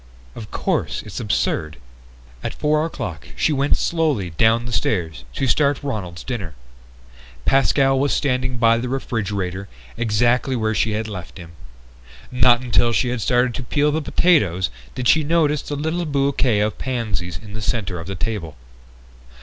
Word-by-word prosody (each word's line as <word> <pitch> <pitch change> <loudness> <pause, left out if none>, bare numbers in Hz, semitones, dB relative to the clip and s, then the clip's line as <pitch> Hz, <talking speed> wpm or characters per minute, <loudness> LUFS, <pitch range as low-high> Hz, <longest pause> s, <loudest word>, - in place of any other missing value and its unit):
"Of 110 -3 -9
course, - - -1
it's - - -6
absurd...." 80 0 -1 0.7
At - - -4
four 150 +1 +1
o'clock 85 - -6
she 155 - +2
went 140 +1 +2
slowly 150 - 0
down 115 +7 +3
the 120 - -5
stairs 80 - -1
to - - 0
start 140 +2 +2
Ronald's 100 -11 -4
dinner. 100 - -5 0.9
Pascal 135 0 +3
was 140 +1 +1
standing 130 -2 0
by 115 0 +4
the 125 +1 -3
refrigerator, 100 -7 -3 0.3
exactly 120 +3 +2
where 110 -2 0
she 110 0 +1
had 110 +1 -2
left 95 -4 -8
him. 85 -3 -10 0.8
Not 125 -1 +5
until 120 -1 +2
she 115 +3 +1
had 125 -2 -2
started 125 +3 +2
to - - -4
peel 145 +4 +1
the 160 +2 0
potatoes 100 - +2 0.2
did 125 -1 -1
she 155 +4 +5
notice 150 -2 +2
the 145 - -5
little 160 +4 -2
bouquet 135 -6 +1
of 105 0 -1
pansies 105 -9 -3
in 105 +3 -11
the 110 - -5
center 100 -5 -2
of 80 - -8
the 95 - -4
table. 90 - -4
120 Hz, 160 wpm, -21 LUFS, 100-135 Hz, 0.9 s, Not